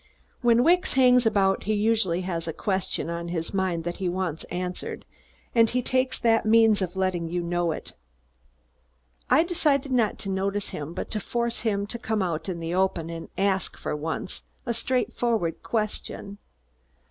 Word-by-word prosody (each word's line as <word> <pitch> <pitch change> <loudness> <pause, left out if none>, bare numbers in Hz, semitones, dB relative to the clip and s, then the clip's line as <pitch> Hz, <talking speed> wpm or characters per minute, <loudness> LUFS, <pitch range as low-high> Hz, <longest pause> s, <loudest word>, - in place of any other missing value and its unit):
When 240 -1 +5
Wicks 355 +4 +3
hangs 250 -2 +5
about 195 -3 +2
he 215 +1 +1
usually 205 -5 +2
has 170 -3 -3
a 165 - -2
question 190 -1 -1
on 170 0 -4
his 170 0 -3
mind 185 -4 0
that 175 +1 -4
he 185 -2 -1
wants 175 -3 -2
answered, 180 0 -4 0.5
and 230 -1 +5
he 250 0 0
takes 255 +1 +1
that 225 -1 +3
means 220 -1 +5
of 180 -1 -2
letting 185 -3 0
you 175 +1 -2
know 175 0 0
it. - - -6 1.4
I - - +6
decided 295 -6 +1
not 235 -5 +2
to 195 - -6
notice 195 +1 -1
him 150 +3 -6
but - - -5
to 215 - -1
force 235 +2 -1
him 200 -3 0
to 235 +3 -5
come 220 -3 0
out 165 0 -2
in 175 -2 -3
the 165 +1 -3
open 180 -3 0
and 165 0 -7
ask, 195 -2 0
for - - -3
once, 160 +4 -4 0.2
a 235 - 0
straightforward 235 -6 0
question. 210 -2 -3
195 Hz, 170 wpm, -26 LUFS, 175-230 Hz, 1.4 s, I